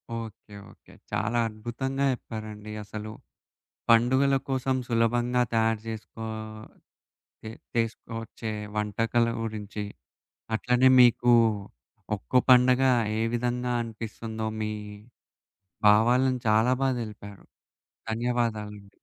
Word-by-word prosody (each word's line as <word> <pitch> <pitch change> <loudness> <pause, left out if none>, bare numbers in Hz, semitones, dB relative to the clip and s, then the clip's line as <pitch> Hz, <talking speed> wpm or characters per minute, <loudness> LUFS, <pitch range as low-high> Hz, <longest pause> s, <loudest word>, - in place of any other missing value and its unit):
Okay. 110 -2 -8 0.2
Okay. - - -21 0.2
చాలా 115 +3 0
అద్భుతంగా 120 +5 -4
జెప్పారండి 110 -3 -7
అసలు. 105 +1 -7 0.8
పండుగల 130 +4 +4
కోసం 130 0 0
సులభంగా 120 +1 +2
తయారు 115 -1 +2
జేసుకో 115 0 -7 1.2
చే 110 - -6 0.3
చేసుకొచ్చే 115 -1 -3 0.2
వంటకాల 115 +3 +1 0.2
గురించి 105 -1 -5 0.7
అట్లనే 125 +3 +3
మీకు 120 0 +5 0.8
ఒక్కొ - - +1
పండగ 125 +1 +6 0.4
ఏ - - +1
విధంగా 125 +1 -1
అనిపిస్తుందో 110 0 -6
మీ 110 0 -2 1.2
భావాలను 125 +4 +4
చాలా 110 +4 +4
బా 135 - +3
దెలిపారు 105 -3 -9 0.7
ధన్యవాదాలండి. 110 -3 -2
115 Hz, 90 wpm, -27 LUFS, 110-125 Hz, 1.2 s, పండగ